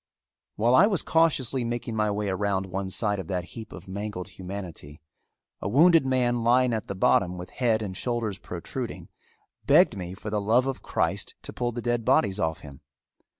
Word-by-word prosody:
While 115 +3 +2
I 185 +10 +7
was 195 -6 +1
cautiously 135 -6 +2
making 120 -1 -3
my 105 -1 +1
way 105 0 -1
around 95 0 0
one 95 +1 -4
side 100 +1 +2
of 95 - -6
that 90 -2 -3
heap 110 -1 -9
of - - -11
mangled 100 -1 -5
humanity, 90 -6 -8 0.6
a 100 - -2
wounded 160 - +5
man 120 -2 +1
lying 125 +1 +3
at 110 - -3
the 100 - -4
bottom, 90 -1 +2
with 90 0 -8
head 115 -3 +1
and 95 -3 -5
shoulders 115 -3 -2
protruding, 115 +8 -6 0.6
begged - - +5
me 90 -1 -6
for 105 +2 -7
the 105 -1 0
love 115 +5 +3
of 135 -1 -3
Christ - - -1
to - - -7
pull 120 -1 -2
the 120 0 -6
dead 120 -1 0
bodies 100 -2 +2
off 80 0 -1
him. 70 0 -12
105 Hz, 190 wpm, -26 LUFS, 95-120 Hz, 0.6 s, I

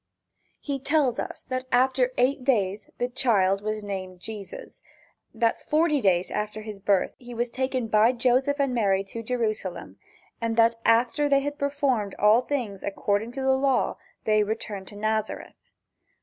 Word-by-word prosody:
He 280 -2 -3
tells 275 -3 +1
us - - -5
that 255 0 -4
after 255 0 +3
eight 255 +2 +2
days 210 -6 0
the 245 - 0
child 205 -7 +2
was 215 0 -3
named, 185 -2 -5
Jesus; 210 0 -8 0.5
that 230 -1 -1
forty 305 -2 +3
days 185 -3 +2
after 210 +1 -3
his 210 -2 -8
birth 195 -1 +1
he 245 -1 -10
was 240 +1 -1
taken 260 -1 -1
by 220 +2 +4
Joseph 260 +4 +1
and 275 -2 +1
Mary 195 -5 +2
to 215 +4 -7
Jerusalem, 215 -6 -3 0.4
and 230 0 -1
that 230 0 +4
after 240 +6 +3
they 275 -1 +4
had 290 +1 -4
performed 275 -8 0
all 210 +3 +5
things 240 -8 -3
according 205 +3 -1
to 270 - -4
the 265 - +3
law 270 0 +1 0.3
they 215 -1 +3
returned 205 -2 -4
to 205 - -11
Nazareth. 215 +1 -3
230 Hz, 160 wpm, -26 LUFS, 210-260 Hz, 0.5 s, all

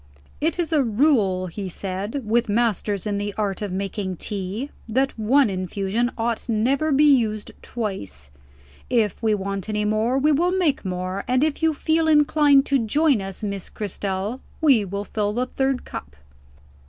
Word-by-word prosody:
"It 325 +4 0
is 335 -2 -1
a 300 - +4
rule," 220 -6 +2
he 190 +2 -5
said, 200 +8 -4
"with 230 +1 +1
masters 210 -3 0
in 205 -1 -1
the 205 0 -4
art 205 -3 -1
of 205 -3 -3
making 190 -1 -3
tea, 205 - -4 0.2
that 265 +4 +1
one 260 +5 +4
infusion 195 +4 -1
ought 230 +1 -2
never 260 +8 +1
to 285 - +2
be 290 - +5
used 230 -8 +3
twice. 100 - -5 0.6
If 225 -6 +1
we 220 -2 +2
want 195 0 -4
any 210 0 0
more, 215 +4 +1
we 295 +3 +3
will 345 +5 +2
make 320 -7 +1
more; 185 +1 -3
and 255 +2 +2
if 310 0 0
you 320 -1 +2
feel 320 +2 +1
inclined 295 -2 +5
to 270 -4 +1
join 280 +1 +2
us, 195 +1 -6
Miss 200 -2 -4
Cristel, 200 +3 -4 0.2
we 275 -9 +4
will 200 +1 -4
fill 210 -1 -1
the 245 +3 0
third 265 0 -1
cup." 70 0 -8
215 Hz, 170 wpm, -23 LUFS, 200-270 Hz, 0.6 s, be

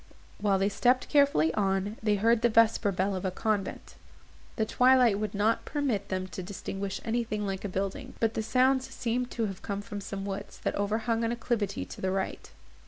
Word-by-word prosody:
While 200 -2 +2
they 195 +1 +2
stepped 245 +5 +2
carefully 280 - +4
on, 195 0 0
they 210 -1 +2
heard 225 +3 +3
the 240 - +4
vesper 225 -2 +4
bell 195 +1 0
of 185 - -4
a 190 - +1
convent. 205 +1 -2 0.6
The 220 - +1
twilight 250 -4 +4
would 210 -1 -3
not 215 +3 +2
permit 255 -10 -2
them 185 -1 -1
to 185 - -6
distinguish 195 +1 -5
anything 225 -2 -1
like 195 -1 -3
a 205 - -3
building, 195 +1 -4
but 225 -1 +1
the 220 - -1
sounds 255 +4 +2
seemed 245 +1 -2
to 225 -2 -1
come 200 0 -4
from 205 -2 -6
some 195 0 -5
woods, 195 -1 -5
that - - 0
overhung 220 +3 0
an 230 - +1
acclivity 230 -4 -2
to - - -10
the 190 - 0
right. 190 0 -3
210 Hz, 190 wpm, -29 LUFS, 195-230 Hz, 0.6 s, carefully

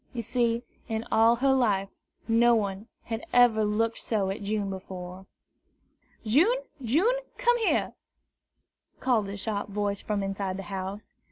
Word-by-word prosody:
You 235 -2 -3
see, 235 0 0 0.2
in 225 0 -3
all 225 +1 +5
her 265 +3 +3
life, 205 -7 +1 0.4
no 235 +1 +5
one 200 0 -2 0.2
had 225 0 -4
ever 240 -3 +5
looked 220 +2 0
so 200 -4 -1
at 200 - -5
June 205 0 -1
before. 185 0 -8 1.0
"June, 330 - +4 0.2
June, 335 - +2 0.2
come 485 -1 +3
here!" 450 - +1 1.1
called 225 -6 +1
a 200 - -5
sharp 205 0 -3
voice 205 0 -2
from 210 -1 -2
the 195 -1 -3
house. 190 +2 -6
215 Hz, 140 wpm, -27 LUFS, 195-240 Hz, 1.1 s, all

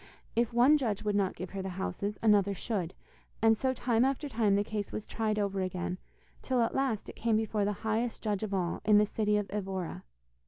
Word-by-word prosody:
If 235 0 +2
one 255 +6 +5
judge 220 -7 -1
would 210 -1 0
not 195 -2 +1
give 180 +1 -6
her 195 - -4
the 190 - -4
houses 200 +2 -3
another 200 -2 +4
should, 190 -5 -3 0.4
and 225 0 +5
so 260 +4 0
time 240 -2 +1
after 275 +2 0
time 220 -6 +2
the 200 - +2
case 210 -1 -4
was 215 - -5
tried 215 -2 -1
over 200 -2 0
again, 185 0 -3 0.4
till 255 -1 0
at 230 - +1
last 265 -6 0
it - - -9
came 225 -1 +1
before 215 -2 0
the 205 - +1
highest 225 +2 -1
judge 210 -3 -1
of 215 -2 -3
all, 180 -3 -1
in 210 -1 +5
the 210 - +5
city 210 0 +1
of 205 -1 -1
Evora. 190 -4 -4
210 Hz, 220 wpm, -31 LUFS, 195-230 Hz, 0.4 s, one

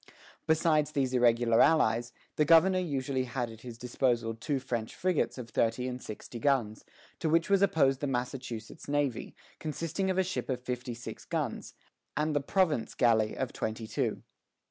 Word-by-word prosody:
Besides 155 -1 +2
these 130 -2 0
irregular 120 -1 +4
allies, 120 -6 +3 0.2
the 150 - +3
governor 170 +4 +5
usually 135 -6 -1
had 125 -2 -3
at 110 0 -13
his 120 -2 -9
disposal 120 -1 0
two 125 +6 -2
French 120 -4 -4
frigates 185 -6 0
of 120 -3 -8
thirty 115 +2 +1
and 125 0 -5
sixty 110 +2 -8
guns, 115 -5 +1 0.4
to 160 - 0
which 165 +5 +2
was 195 -1 +5
opposed 140 -9 +3
the 145 - -2
Massachusetts 125 -1 -4
navy, 145 -5 -1 0.2
consisting 165 +5 -2
of 185 - 0
a 190 - +4
ship 185 -4 -4
of 130 -2 -1
fifty 125 -1 -4
six 120 - -8
guns, - - -3 0.4
and 150 0 0
the 145 - +2
"province 155 - +1
galley," 110 -3 +3
of 130 - -2
twenty 110 +1 -3
two. - - -2
130 Hz, 165 wpm, -30 LUFS, 120-155 Hz, 0.4 s, governor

